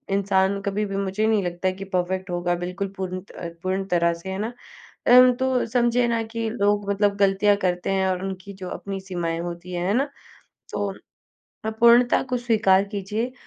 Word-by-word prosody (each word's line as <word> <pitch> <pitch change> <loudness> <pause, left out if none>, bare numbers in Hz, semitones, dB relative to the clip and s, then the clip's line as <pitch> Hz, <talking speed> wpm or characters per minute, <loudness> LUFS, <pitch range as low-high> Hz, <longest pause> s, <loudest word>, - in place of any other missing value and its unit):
इंसान 195 0 +2
कभी 200 +1 -1
भी 195 -1 -4
मुझे 200 +2 0
नहीं 215 -3 +2
लगता 175 +1 -1
कि 190 +1 -8
परफ़ेक्ट 185 +1 -1
होगा 175 0 0
बिल्कुल 190 +2 -3
पूर्ण 185 -1 -4
त 170 -1 -8
पूर्ण 190 +1 -1
तरह 170 -1 +3
से, 170 +3 -8
है 190 0 -4
ना 225 +3 -3 0.5
अम, 250 +1 +8
तो 260 0 0
समझिए 240 +1 +2
ना 230 -1 0
कि 225 -1 -1
लोग 205 -2 0
मतलब 200 0 +2
गलतियाँ 200 +1 +3
करते 180 0 -1
हैं 190 0 +1
और 185 0 -1
उनकी 195 +1 -6
जो 185 -1 -7
अपनी 195 +1 -5
सीमाएँ 175 -3 -3
होती 175 +1 -6
हैं, 175 0 -2
है 200 - +2
ना, 275 +5 +1 0.6
तो 205 -1 -2 0.7
अपूर्णता 235 +2 +5
को - - +3
स्वीकार 215 -5 +3
कीजिए 210 +5 -3
195 Hz, 185 wpm, -24 LUFS, 185-220 Hz, 0.7 s, अम